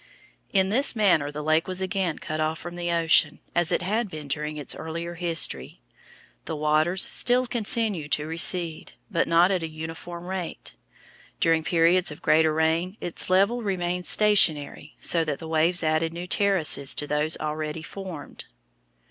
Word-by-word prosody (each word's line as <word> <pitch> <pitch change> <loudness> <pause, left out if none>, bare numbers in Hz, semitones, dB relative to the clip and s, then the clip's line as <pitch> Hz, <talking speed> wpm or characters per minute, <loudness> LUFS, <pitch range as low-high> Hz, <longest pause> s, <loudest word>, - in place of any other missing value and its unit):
In 190 -1 +2
this 255 +5 +2
manner 180 -9 +2
the 150 +1 -6
lake 155 +1 +1
was 185 0 -3
again 190 -3 -1
cut 155 0 -5
off 155 +1 -1
from 175 +2 -9
the 175 0 -3
ocean, 165 -1 +2
as 175 -1 +1
it - - 0
had 215 +4 -1
been 155 -4 -8
during 150 +2 -3
its 145 - -2
earlier 170 +2 -6
history. 165 - -2 0.7
The 160 - -4
waters 155 +4 +3
still 250 +1 +2
continued 215 - 0
to 150 - -1
recede, 165 0 +1 0.2
but 170 -4 0
not 170 +3 +4
at 185 -2 0
a 165 - -3
uniform 165 +2 -8
rate. 180 - -5 0.7
During 165 -1 +2
periods 170 +3 +3
of 150 +3 -9
greater 160 0 +3
rain 160 +5 0
its 175 - -3
level 200 +6 +2
remained 180 -3 -2
stationary, 160 -8 +2
so 165 -1 +2
that 150 -3 -3
the 160 - -9
waves 165 +2 +2
added 160 +1 0
new 175 +1 -6
terraces 180 -8 +2
to 150 - -3
those 150 +2 0
already 155 +1 -4
formed. 185 -3 -8
165 Hz, 165 wpm, -25 LUFS, 155-185 Hz, 0.7 s, not